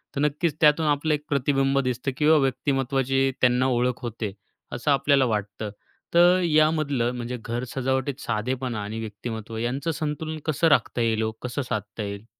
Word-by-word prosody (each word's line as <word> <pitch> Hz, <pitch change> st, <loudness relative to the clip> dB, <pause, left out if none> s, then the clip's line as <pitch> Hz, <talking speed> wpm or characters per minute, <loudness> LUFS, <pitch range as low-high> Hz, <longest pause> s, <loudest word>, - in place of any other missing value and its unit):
तर 140 Hz, -, -1 dB
नक्कीच 150 Hz, +1 st, 0 dB
त्यातून 150 Hz, +1 st, +5 dB
आपलं 150 Hz, +1 st, +1 dB
एक 150 Hz, 0 st, -2 dB
प्रतिबिंब 135 Hz, -1 st, +2 dB
दिसतं 125 Hz, +2 st, -2 dB
किंवा 155 Hz, +1 st, +5 dB
व्यक्तिमत्त्वाची 135 Hz, 0 st, +1 dB
त्यांना 125 Hz, +1 st, +3 dB
ओळख 125 Hz, -1 st, 0 dB
होते, 115 Hz, -3 st, -4 dB, 0.4 s
असं 145 Hz, +4 st, -1 dB
आपल्याला 140 Hz, -1 st, +3 dB
वाटतं. 105 Hz, -1 st, -3 dB, 0.4 s
तर 175 Hz, +2 st, +6 dB
यामधलं 155 Hz, -6 st, +2 dB
म्हणजे 125 Hz, +1 st, -4 dB
घर 120 Hz, +2 st, -3 dB
सजावटीत 130 Hz, +1 st, -1 dB
साधेपणा 125 Hz, +1 st, -2 dB
आणि 110 Hz, +2 st, -5 dB
व्यक्तिमत्त्व 110 Hz, +1 st, -6 dB
यांचं 135 Hz, +8 st, -1 dB
संतुलन 155 Hz, +1 st, -3 dB
कसं 155 Hz, +1 st, +2 dB
राखता 145 Hz, -5 st, +2 dB
येईल 110 Hz, -1 st, +1 dB
हो, 110 Hz, -, -1 dB
कसं 125 Hz, +3 st, -3 dB
साधता 105 Hz, 0 st, -4 dB
येईल? 100 Hz, +1 st, -6 dB
130 Hz, 155 wpm, -25 LUFS, 120-150 Hz, 0.4 s, तर